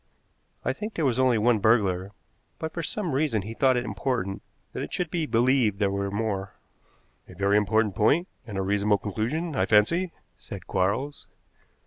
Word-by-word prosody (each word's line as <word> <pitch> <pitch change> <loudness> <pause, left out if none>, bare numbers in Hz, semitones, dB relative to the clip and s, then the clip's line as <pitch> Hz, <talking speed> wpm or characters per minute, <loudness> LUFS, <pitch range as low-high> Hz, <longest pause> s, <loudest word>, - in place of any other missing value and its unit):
"I 130 - +1
think 210 +10 -6
there 160 - 0
was 130 -2 +1
only 130 -3 +4
one 110 +1 +3
burglar, 100 -3 +2 0.5
but 160 0 -5
for 170 - -3
some 180 +1 -3
reason 130 -7 +1
he 110 +3 -6
thought 130 +1 +3
it 120 - -1
important 100 -1 -2 0.3
that - - -4
it - - -5
should 175 -3 -2
be 165 -3 -1
believed 120 -2 +3
there 100 -1 +1
were 100 0 -1
more." 100 -2 -2 0.8
"A 90 - -12
very 100 +2 +2
important 105 0 +2
point, 140 - +3 0.2
and 100 -3 -5
a 95 - 0
reasonable 100 +1 +2
conclusion, 125 - -2
I 95 -5 +1
fancy," 170 - +3 0.3
said 100 -4 -9
Quarles. 100 +10 -1
110 Hz, 175 wpm, -26 LUFS, 100-135 Hz, 0.8 s, only